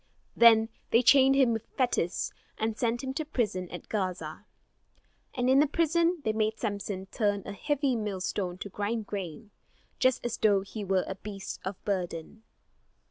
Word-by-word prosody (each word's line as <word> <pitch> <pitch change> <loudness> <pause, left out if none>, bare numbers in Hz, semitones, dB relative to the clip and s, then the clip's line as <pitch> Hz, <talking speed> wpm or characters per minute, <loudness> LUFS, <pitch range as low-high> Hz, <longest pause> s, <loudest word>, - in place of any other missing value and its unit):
Then 225 -1 +7 0.2
they 230 +2 +4
chained 270 +2 +6
him 260 -4 +4
with 225 0 -4
fetters, 240 -9 0 0.2
and 220 0 -1
sent 240 +2 -1
him 265 0 -3
to 315 - -2
prison 215 - -2
at 175 - -8
Gaza. 185 -2 -3 0.9
And 245 0 0
in 265 +1 +5
the 300 - +5
prison 335 +2 +1
they 220 - +1
made 220 0 0
Samson 200 -3 -3
turn 205 -3 0
a - - -5
heavy 280 +2 0
millstone 190 -3 -2
to 200 - -7
grind 210 +3 -2
grain, 200 0 -6 0.5
just 255 -2 +2
as 240 - -2
though 205 -3 +4
he 205 +2 -7
were 190 -1 +1
a - - -3
beast 195 0 -7
of 190 +1 -3
burden. 185 +1 -3
215 Hz, 165 wpm, -29 LUFS, 195-250 Hz, 0.9 s, Then